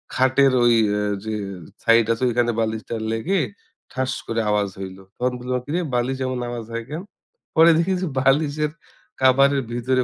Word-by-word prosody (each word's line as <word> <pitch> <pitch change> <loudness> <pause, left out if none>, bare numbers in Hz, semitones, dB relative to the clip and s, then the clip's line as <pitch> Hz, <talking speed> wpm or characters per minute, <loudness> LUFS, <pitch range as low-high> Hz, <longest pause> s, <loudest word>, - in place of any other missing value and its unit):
খাটের 130 +1 +4
ওই 120 0 +5 0.2
আ - - 0 0.2
যে 110 - -3 0.5
সাইড 115 0 +5
আছে, 115 - -5
ঐখানে 120 0 +1
বালিশটা 110 +1 -3 0.2
লেগে 165 +13 0 0.5
ঠাস 130 +1 -1 0.2
করে 115 0 0
আওয়াজ 105 -1 +1
হইলো। 95 0 -8
তখন 125 +1 0
বললাম, 125 +1 -2
"কিরে? 155 +5 -1 0.2
বালিশ 125 +2 0
এমন 130 -1 -2
আওয়াজ 120 -2 -5
হয় 115 0 -3
কেন?" 155 +3 -4 0.5
পরে 165 +1 +7
দেখি 170 +3 +1
যে 185 - -1
বালিশের 145 +3 +2 0.5
কাভারের 135 +2 +4
ভিতরে 125 +2 +1
130 Hz, 160 wpm, -22 LUFS, 115-140 Hz, 0.5 s, পরে